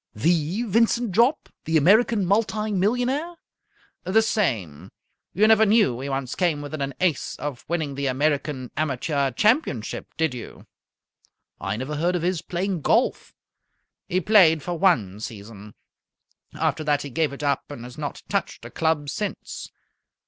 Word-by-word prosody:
"The 165 - +1
Vincent 230 +1 +2
Jopp? 235 - +2 0.2
The 160 +1 +2
American 205 +6 +4
multi 215 +2 0
millionaire?" 245 - 0 0.7
"The 220 +4 +3
same. 115 - -1 0.4
You 210 +4 +3
never 220 0 +6
knew 205 - +3
he 140 +2 -4
once 135 -2 -3
came 165 -5 0
within 145 0 -6
an 135 -1 -3
ace 175 -8 0
of 145 -3 -6
winning 160 -4 -2
the 140 0 -2
American 140 -1 -1
Amateur 140 -1 0
Championship, 175 - 0
did 160 -4 +1
you?" 120 -2 -9 0.9
"I 95 +2 -3
never 140 +5 -4
heard 175 +4 +1
of 170 - -2
his 180 -2 0
playing 180 0 -3
golf." - - +1 0.7
"He 185 - +1
played 170 -6 +5
for 175 - -3
one 120 - +2
season. 105 -1 -9 0.8
After 155 - -1
that 145 -1 +1
he 140 - -7
gave 155 +3 0
it 140 +1 -8
up 140 -1 -1
and 145 -5 -8
has 125 0 -10
not 145 -1 -6
touched - - -3
a - - -9
club 160 -2 0
since. 205 +7 -5
160 Hz, 150 wpm, -24 LUFS, 135-200 Hz, 0.9 s, never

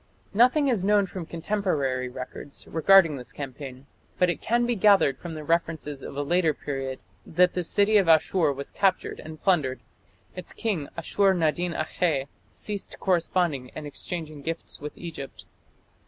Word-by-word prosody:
Nothing 255 +7 +4
is 230 -8 +1
known 205 0 +4
from 180 -3 -7
contemporary 155 -9 -1
records 130 +3 -8
regarding 165 -2 +5
this 125 - -8
campaign; 135 -1 -8 0.3
but 180 -1 +3
it - - -6
can 240 +2 +2
be 240 - +1
gathered 195 - +5
from 170 -2 -7
the 155 - -6
references 160 -3 -1
of 140 - -8
a 145 - 0
later 165 0 +2
period 135 -2 -4 0.3
that 180 +2 +3
the 180 - -1
city 205 +5 +3
of 195 -4 +3
Asshur 160 0 +4
was 140 0 -6
captured 195 -2 0
and 155 0 -9
plundered; 150 -10 +1 0.6
its 180 - -5
king, 190 -11 -2
Ashur 195 +3 +2
nadin 170 +1 0
akhe, 155 -3 0 0.3
ceased 205 -2 -6
corresponding 170 -7 +1
and 155 - -6
exchanging 155 0 -6
gifts 165 0 -5
with 150 0 -7
Egypt. 160 -6 -8
165 Hz, 155 wpm, -26 LUFS, 145-190 Hz, 0.6 s, regarding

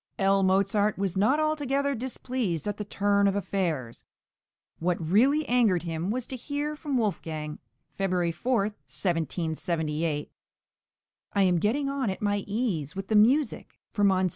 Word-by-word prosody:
L. 195 0 +3
Mozart 200 +2 +2
was 195 -2 -1
not 215 +10 +3
altogether 280 -2 0
displeased 245 - -3
at 205 0 -2
the 210 - -3
turn 200 0 +2
of 195 - +1
affairs; 170 -11 -2 0.8
what 175 +1 +1
really 245 - +3
angered 225 -8 +3
him 165 +1 -3
was 245 +2 -1
to 265 - -5
hear 290 +4 -3
from 295 -3 -2
Wolfgang 160 -9 -2 0.3
(February 180 -3 0
4, 240 +7 0
1778): 160 -5 -2 1.0
"I 200 - +3
am 180 -2 +3
getting 260 - +1
on 275 -5 -1
at 190 - -3
my 205 -1 +1
ease 195 - -2
with 195 - -5
the 220 - +2
music 255 +8 +3
for 205 - -1
Mons. 190 -2 +3
200 Hz, 145 wpm, -27 LUFS, 175-245 Hz, 1.0 s, L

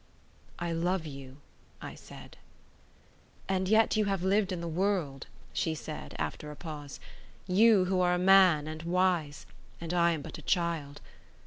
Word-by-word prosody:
"I 170 -1 -3
love 170 +1 -1
you," 135 -2 -9 0.4
I - - -8
said. - - -13 1.1
"And 190 -1 0
yet 220 +2 +4
you 215 -1 +2
have 195 -3 -1
lived 195 +1 +2
in 180 - -3
the 170 - -5
world," 165 -5 -1 0.3
she 160 -1 -1
said; 155 0 -8
after 150 - -4
a 150 - -8
pause, 145 -2 -8 0.5
"you 195 +1 +5 0.2
are 180 0 +3
a - - 0
man 180 -5 +5
and 155 0 -6
wise; 170 -3 0 0.3
and 170 0 -5
I 170 -1 +3
am 155 -3 -5
but - - -8
a - - -9
child. 165 -6 -1
170 Hz, 155 wpm, -30 LUFS, 155-190 Hz, 1.1 s, you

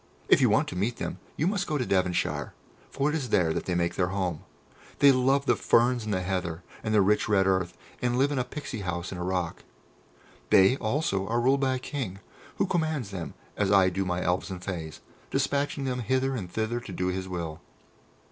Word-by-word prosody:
If - - +6
you - - +5
want - - +3
to - - -6
meet 105 +6 -1
them, - - -4 0.2
you 155 - +1
must 190 0 0
go 150 - 0
to 125 - -1
Devonshire, 90 -3 0 0.3
for 140 +2 0
it 150 - -1
is 135 -6 -2
there 85 -6 +3
that - - -3
they 90 - -1
make 85 0 +1
their 90 - +1
home. 90 -4 -2 0.6
They 140 -1 +7
love 135 +2 +2
the - - +4
ferns 120 -1 +3
and 110 - -2
the 95 -2 0
heather, 90 -2 -2 0.2
and 110 - -1
the 105 -2 +5
rich 105 +3 +2
red 95 -2 +4
earth, 95 -2 0 0.2
and 125 0 +1
live 140 +3 +3
in 140 - 0
a - - +1
Pixy 125 -3 -6
house 90 -1 -3
in 90 - -5
a - - -2
rock. 90 -2 -2 0.9
They, 95 +6 +6
also, 110 -5 -1
are 115 +1 +1
ruled 130 +3 +3
by 130 -1 +1
a - - -1
King, 125 -7 -4 0.4
who - - +2
commands 155 - -1
them 90 -4 -6 0.2
as 100 -1 +1
I 95 -2 +6
do 95 +2 -1
my 90 -1 -1
Elves 90 +4 0
and 90 -1 -6
Fays, 80 -6 -5 0.3
despatching 140 0 0
them 130 -1 -1
hither 130 +3 0
and 95 -7 -5
thither 110 +2 -1
to 120 - -9
do 90 0 -1
his 95 0 -3
will. 85 -3 -4
105 Hz, 220 wpm, -28 LUFS, 90-130 Hz, 0.9 s, They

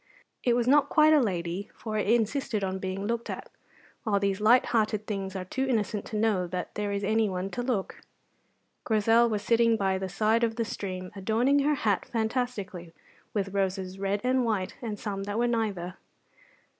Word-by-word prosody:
It 240 -1 +3
was 240 0 +1
not 285 +1 +5
quite 310 0 +5
a 305 - +6
lady, 180 -2 -2
for 220 -2 -5
it 210 - 0
insisted 225 -1 +1
on 190 0 -2
being 190 +1 -3
looked 235 +2 -2
at; - - -6 0.5
while 205 -3 +1
these 200 0 0
light 240 +4 +5
hearted 215 -2 +1
things 195 -2 -4
are 185 -1 -4
too 265 +8 -2
innocent 215 -4 -1
to - - -6
know 210 -5 +1
that 180 +1 -4
there 210 -1 -2
is 200 0 -2
anyone 200 -3 0
to 245 - -3
look. 240 -6 -2 0.8
Grizel 225 +2 +4
was 210 -2 -2
sitting 230 0 +3
by 190 -2 0
the 190 0 -3
side 215 +4 +2
of 225 -1 +1
the 230 -1 -1
stream, 185 -3 -5
adorning 225 +8 +2
her 295 +2 +2
hat 210 -7 0
fantastically 220 -7 -3 0.4
with 195 -2 -1
roses 190 -1 -2
red 200 +1 -1
and 255 0 +2
white 205 -5 -1
and 220 -4 -4
some 195 -1 -4
that 205 +1 -3
were 240 - +2
neither. 200 -6 -2
210 Hz, 185 wpm, -28 LUFS, 195-235 Hz, 0.8 s, a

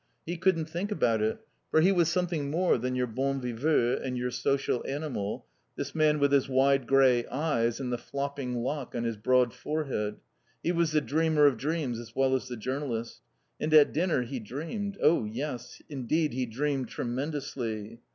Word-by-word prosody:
He 175 - -3
couldn't 165 -2 +2
think 175 +6 -4
about 115 - +2
it. 110 +1 -1 0.3
For 155 - +4
he 180 +5 +5
was 170 -4 +3
something 170 -5 -1
more 170 -2 +2
than 125 +2 -2
your 125 0 +1
bon 135 +4 -1
viveur 125 +1 +1
and 125 -1 -2
your 125 0 -2
social 135 0 0
animal, 135 -8 -3 0.3
this 140 -1 -4
man 155 -1 +3
with 140 -1 +2
his 140 -1 +3
wide 135 -1 +3
grey 130 -3 +4
eyes 120 -5 0
and 125 -2 -2
the 120 - -2
flopping 140 -2 -3
lock 140 0 -3
on 120 - -1
his 115 -1 -1
broad 125 +3 +2
forehead. 135 -9 -2 0.5
He 170 - +1
was 170 -2 +1
the 150 0 +3
dreamer 155 0 +3
of 140 -3 +5
dreams 140 -2 -2
as 120 - -11
well 135 0 +2
as 130 0 0
the 125 -1 -5
journalist. 120 -1 -4 0.4
And 155 - -1
at 150 -2 +7
dinner 165 -5 +1
he 125 +2 -5
dreamed 165 - -5
Oh, 155 -9 +4
yes, 125 +2 -5
indeed, 150 +1 0
he 130 0 -1
dreamed 135 +3 -1
tremendously. 120 -4 -4
135 Hz, 180 wpm, -29 LUFS, 120-155 Hz, 0.5 s, at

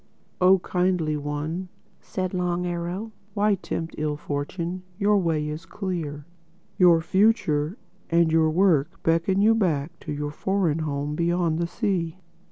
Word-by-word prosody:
"Oh 185 +1 +7
Kindly 180 -4 0
One," 150 +5 -3 0.3
said 185 0 -4
Long 180 -1 0
Arrow, 175 +5 -3 0.2
"why 210 0 +3
tempt 165 -3 -4
ill 150 -1 -1
fortune? 170 +6 -4 0.2
Your 205 0 +3
way 160 -4 0
is 155 +2 -6
clear. 165 -7 -4 0.5
Your 175 -3 +6
future 185 -3 +2 0.3
and 170 -1 +3
your 160 -1 +4
work 160 -4 +2
beckon 170 +4 +2
you 225 +1 +6
back 170 -6 0
to 150 - -7
your 145 0 -3
foreign 180 -2 0
home 145 -1 -2
beyond 170 0 +1
the 170 - 0
sea. 175 -2 -1
170 Hz, 140 wpm, -25 LUFS, 155-185 Hz, 0.5 s, Oh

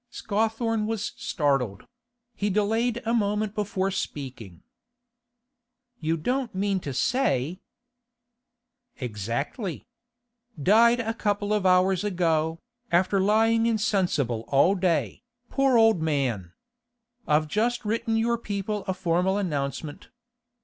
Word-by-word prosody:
Scawthorne 225 +1 -1
was 220 -2 -3
startled; 135 - -1 0.5
he 205 - -1
delayed 225 +4 0
a 230 - 0
moment 210 -2 0
before 195 -2 -1
speaking. 125 - -6 1.4
'You 160 0 0
don't 250 - -2
mean 195 0 0
to 145 - -5
say—' 170 - 0 1.4
'Exactly. 125 - -4 0.7
Died 230 - +5
a 225 -1 -1
couple 205 -2 -1
of 205 -3 +2
hours 185 0 +3
ago, 165 -5 0 0.3
after 185 +3 +3
lying 225 +3 +3
insensible 185 - 0
all 145 +7 +4
day, 180 -4 0 0.3
poor 270 -3 +3
old 225 -6 +4
man! 130 - -1 0.7
I've 155 +1 +2
just 230 +6 0
written 225 +1 0
your 235 +1 +1
people 205 -1 -3
a 190 - -1
formal 180 +1 +1
announcement. 145 -5 -3
195 Hz, 110 wpm, -26 LUFS, 155-220 Hz, 1.4 s, Died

